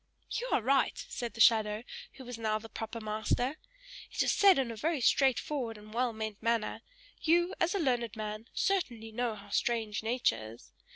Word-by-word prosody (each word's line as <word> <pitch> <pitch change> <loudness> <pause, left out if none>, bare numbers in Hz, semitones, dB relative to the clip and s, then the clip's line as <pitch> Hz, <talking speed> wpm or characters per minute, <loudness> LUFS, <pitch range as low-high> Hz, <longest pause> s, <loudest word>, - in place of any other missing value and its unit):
"You - - -2
are 230 - +2
right," 270 +2 +2
said 240 -1 -4
the - - -10
shadow, 215 -1 +5 0.3
who 260 - -11
was 245 -1 -7
now 215 -1 +1
the 220 +1 -9
proper 225 +1 -5
master. 220 +6 -1 0.5
"It - - +1
is - - +2
said 395 -3 +6
in 260 -3 0
a - - -6
very 310 +7 0
straight 265 +1 +4
forward 245 -7 -3
and 210 +1 -13
well 245 +1 +1
meant 220 -2 -5
manner. 230 -2 0 0.4
You, 345 +2 +3
as 345 +3 +2
a - - +1
learned 245 - 0
man, 215 +1 -5
certainly 245 - -1
know 235 0 -1
how 200 0 -13
strange 225 -3 0
nature 165 - 0
is. 115 - -17
230 Hz, 190 wpm, -31 LUFS, 215-260 Hz, 0.5 s, said